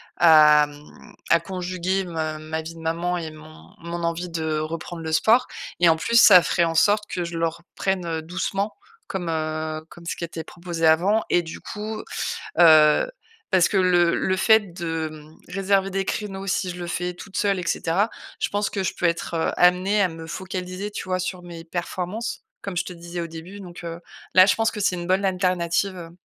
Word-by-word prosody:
à, 150 -2 +7
mmh, 145 0 -15
à 170 - +5
conjuguer 185 +1 -2
me 160 -3 -3
ma 155 +1 -4
vie 165 +1 -9
de - - -12
maman 170 +2 -1
et 160 -2 -5
mon 155 0 -15
mon 170 0 -5
envie 170 +1 -2
de 160 -2 -2
reprendre 165 +2 -5
le 160 - -4
sport 230 +10 +4 0.3
et 175 - +7
en 160 - +4
plus, 230 +7 +4
ça 185 -5 +9
ferait 170 - +1
en 165 0 -2
sorte 205 +5 +3
que 175 -1 -3
je 170 0 -5
le 165 0 +2
reprenne, 180 +2 -3
heu, 165 -1 -2
doucement. 195 +4 -2 0.4
Comme, 180 -3 -3
heu, 155 -1 -2
comme 170 - -14
ce - - -4
qui 170 - -3
était 165 -1 -7
proposé 170 0 -4
avant 185 +8 +4
et 175 - +3
du 165 -1 -9
coup, 215 0 -6 0.6
heu 155 - +6 0.4
parce 185 -3 +4
que - - -1
le 175 -2 +4
le 185 - 0
fait 210 -1 +4
de 160 -3 -4 0.2
réserver 195 +1 +1
des 195 0 -1
créneaux 195 -1 -4
si 185 -1 -1
je 175 - -7
le 175 -1 -5
fais 180 +1 -3
toute 190 +2 -10
seule 200 -2 +1
et 175 - -5
cetera, 185 +6 0 0.3
je - - 0
pense 205 0 -1
que 195 - -2
je - - -1
peux 180 - 0
être, 170 0 -2
heu, 165 - +1
amenée 185 +4 +4
à 190 - +3
me 165 -1 -9
focaliser, 185 +2 -5
tu - - -4
vois, 185 0 -1
sur 180 0 -4
mes 170 -1 -9
performances 180 +6 -4 0.2
comme 195 -3 -5
je 175 - 0
te - - -7
disais 175 0 -7
au 170 - -3
début, 165 +5 -9
donc 175 -3 -10
heu, 170 0 -6 0.3
là, 185 0 +8
je - - +4
pense 225 0 +1
que - - -8
c'est 195 -2 +2
une 175 0 -5
bonne 190 +2 +2
alternative, 185 0 0
heu. 170 0 -10
175 Hz, 210 wpm, -23 LUFS, 165-190 Hz, 0.6 s, ça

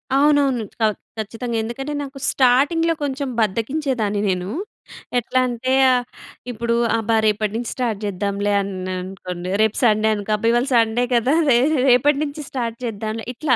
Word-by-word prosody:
అవునవును, 280 -4 +3 0.2
ఖ - - +3 0.3
ఖచ్చితంగా 225 +2 -4
ఎందుకంటే, 270 +6 -5
నాకు 275 0 -9
స్టార్టింగ్‌లో 285 +6 +3
కొంచెం 280 0 -2
బద్దకించేదాన్ని 225 -1 -1
నేను. 185 +1 -2 0.7
ఎట్లా 245 +2 0
అంటే 250 +2 -2 0.2
ఆహ్, 245 -1 +1 0.5
ఇప్పుడు 235 0 -1 0.2
అబ్బా! 225 0 0
రేపటి 215 -1 +1
నుంచి 235 0 -3
స్టార్ట్ 230 -5 -2
చేద్దాంలే 200 +1 -1
అన్నానుకోండి, 185 -1 -5
రేపు 220 -1 +2
సండే 215 -2 +3
అనుకో 205 +1 -5
అబ్బా! 210 +2 -1
ఇవాళ 240 +3 +1
సండే 230 +1 +3
కదా! 245 +4 +2 0.2
రే 235 - +6 0.3
రేపటి 275 +4 +4
నుంచి 295 +1 -5
స్టార్ట్ 235 -3 -3
చేద్దాంలే 220 0 -4
ఇట్లా, 255 0 +1
235 Hz, 140 wpm, -21 LUFS, 210-260 Hz, 0.7 s, రే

